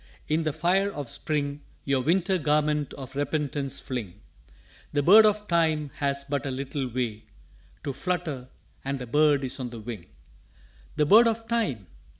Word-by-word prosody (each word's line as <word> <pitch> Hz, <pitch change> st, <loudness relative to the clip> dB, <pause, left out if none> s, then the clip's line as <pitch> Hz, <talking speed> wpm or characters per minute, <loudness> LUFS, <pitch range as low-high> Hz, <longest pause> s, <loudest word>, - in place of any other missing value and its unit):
"In 155 Hz, +2 st, +1 dB
the 155 Hz, -1 st, 0 dB
fire 190 Hz, +6 st, +1 dB
of 145 Hz, -9 st, -5 dB
Spring 145 Hz, -1 st, -2 dB, 0.2 s
Your 140 Hz, -2 st, +2 dB
Winter 180 Hz, +5 st, +2 dB
garment 150 Hz, -1 st, +1 dB
of 135 Hz, 0 st, -9 dB
Repentance 145 Hz, -1 st, -2 dB
fling. 105 Hz, -7 st, -5 dB, 0.7 s
The 145 Hz, -1 st, +1 dB
Bird 215 Hz, +7 st, +8 dB
of 210 Hz, 0 st, 0 dB
Time 160 Hz, -4 st, +1 dB
has 140 Hz, -1 st, 0 dB
but 140 Hz, 0 st, -2 dB
a -, -, -1 dB
little 135 Hz, +1 st, -3 dB
way 120 Hz, -3 st, -3 dB, 0.6 s
To 140 Hz, -, -3 dB
flutter 160 Hz, -6 st, -3 dB, 0.4 s
and 135 Hz, +1 st, -2 dB
the 125 Hz, -, -6 dB
Bird 145 Hz, +2 st, +3 dB
is 130 Hz, -, -3 dB
on 125 Hz, -2 st, -3 dB
the 115 Hz, -1 st, -8 dB
Wing._" 110 Hz, -5 st, -7 dB, 0.9 s
"The 150 Hz, -, +2 dB
Bird 220 Hz, +9 st, +7 dB
of 225 Hz, 0 st, -1 dB
Time?" 210 Hz, -, -1 dB
145 Hz, 160 wpm, -27 LUFS, 130-165 Hz, 0.9 s, Bird